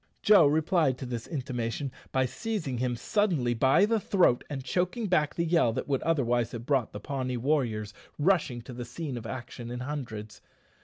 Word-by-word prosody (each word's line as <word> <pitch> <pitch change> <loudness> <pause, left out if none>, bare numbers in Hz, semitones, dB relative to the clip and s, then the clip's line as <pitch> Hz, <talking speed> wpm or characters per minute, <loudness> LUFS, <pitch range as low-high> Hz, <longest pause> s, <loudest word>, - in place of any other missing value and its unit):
Joe 200 -8 +7
replied 155 -2 +2
to 130 - -6
this 120 -2 -5
intimation 130 -2 -3 0.2
by 130 0 +2
seizing 155 - -3
him 125 -1 0
suddenly 150 - +1
by 130 - +4
the 225 +1 +1
throat 185 - +3
and 135 -3 -4
choking 180 - -1
back 155 -6 +1
the 170 - 0
yell 165 -8 +3
that - - -3
would 135 -2 0
otherwise 120 -7 +1
have 120 0 -6
brought 135 -5 +1
the 105 - -7
Pawnee 130 +1 -3
warriors 115 -6 0 0.2
rushing 150 -8 +1
to 125 - -9
the 120 0 -5
scene 130 +3 -5
of 115 -2 -6
action 120 -1 -7
in 125 +1 -5
hundreds. 115 -7 -6
130 Hz, 185 wpm, -29 LUFS, 120-160 Hz, 0.2 s, Joe